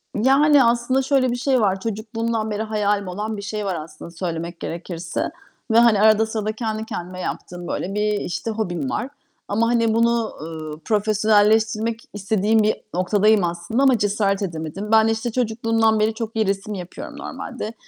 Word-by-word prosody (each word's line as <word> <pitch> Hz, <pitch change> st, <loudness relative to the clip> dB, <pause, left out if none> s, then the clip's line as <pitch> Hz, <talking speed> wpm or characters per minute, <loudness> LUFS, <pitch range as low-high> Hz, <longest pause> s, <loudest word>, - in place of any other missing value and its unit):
Yani, 275 Hz, +5 st, +5 dB
aslında 240 Hz, +3 st, +2 dB
şöyle 260 Hz, -2 st, +2 dB
bir -, -, -1 dB
şey 260 Hz, 0 st, +1 dB
var. 195 Hz, -2 st, +1 dB
Çocukluğumdan 220 Hz, +1 st, -3 dB
beri 210 Hz, -, -2 dB
hayalim 210 Hz, -2 st, 0 dB
olan 210 Hz, +4 st, -4 dB
bir -, -, -5 dB
şey 210 Hz, 0 st, -4 dB
var 190 Hz, -, -1 dB
aslında 155 Hz, +1 st, -8 dB
söylemek 170 Hz, 0 st, -4 dB
gerekirse. 170 Hz, 0 st, -4 dB, 0.4 s
Ve, 230 Hz, -, +6 dB
hani, 225 Hz, -4 st, +5 dB
arada 220 Hz, 0 st, +5 dB
sırada 215 Hz, -1 st, -2 dB
kendi 220 Hz, -1 st, -3 dB
kendime 180 Hz, -2 st, -6 dB
yaptığım, 175 Hz, -1 st, -5 dB
böyle, 195 Hz, +3 st, -3 dB
bir, 210 Hz, 0 st, +1 dB
işte, 225 Hz, +5 st, -3 dB
hobim 175 Hz, -10 st, -2 dB
var. 255 Hz, +4 st, -2 dB, 0.4 s
Ama, 225 Hz, +3 st, +1 dB
hani, 230 Hz, -2 st, +2 dB
bunu, 230 Hz, 0 st, +2 dB
ııı, 155 Hz, -1 st, -7 dB
profesyonelleştirmek 215 Hz, +1 st, +2 dB
istediğim 210 Hz, +1 st, +1 dB
bir 215 Hz, -, +2 dB, 0.2 s
noktadayım 205 Hz, +3 st, +3 dB
aslında 175 Hz, +9 st, -1 dB
ama 265 Hz, -3 st, +5 dB
cesaret 205 Hz, -1 st, +1 dB
edemedim. 170 Hz, +2 st, -4 dB
Ben, 220 Hz, 0 st, +6 dB
işte, 225 Hz, +1 st, -1 dB
çocukluğumdan 225 Hz, -2 st, +1 dB
beri 215 Hz, +1 st, +2 dB
çok 225 Hz, 0 st, -5 dB
iyi 220 Hz, -1 st, +2 dB
resim 200 Hz, +2 st, -2 dB
yapıyorum 180 Hz, -2 st, -8 dB
normalde. 220 Hz, -, -6 dB
215 Hz, 165 wpm, -22 LUFS, 195-225 Hz, 0.4 s, Ve